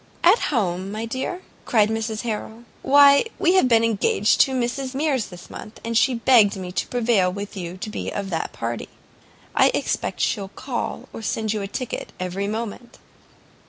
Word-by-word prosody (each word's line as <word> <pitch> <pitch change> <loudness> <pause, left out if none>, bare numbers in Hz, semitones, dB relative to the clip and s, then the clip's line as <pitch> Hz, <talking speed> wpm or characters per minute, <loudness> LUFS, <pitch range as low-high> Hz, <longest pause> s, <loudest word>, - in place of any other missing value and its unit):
"At 370 +7 +6
home, 190 - -1
my 215 +2 -4
dear?" 260 +10 -4 0.2
cried 215 -3 +3
Mrs 220 -1 -2
Harrel; 225 0 -5 0.2
"why 280 +3 +6
we 350 - +3
have 375 -9 +4
been 230 -2 +4
engaged 215 -1 +2
to 265 - +3
Mrs 260 +1 -2
Mears 275 -5 0
this 180 -1 -12
month, 215 - -10
and 230 0 -2
she 255 +2 +3
begged 230 -4 +5
me 185 -2 -6
to 185 - -2
prevail 225 -7 +2
with 200 +2 -6
you 180 -1 -6
to 205 - -6
be - - -4
of 200 -1 -4
the 165 - -2
party. 115 0 -5 0.7
I - - +5
expect - - -2
she'll 195 -1 0
call, 250 +3 -5
or - - -7
send 220 0 -1
you 215 - -2
a 195 - -3
ticket, 250 +4 -5
every 185 +2 -3
moment." 225 +2 -5
225 Hz, 180 wpm, -23 LUFS, 200-250 Hz, 0.7 s, At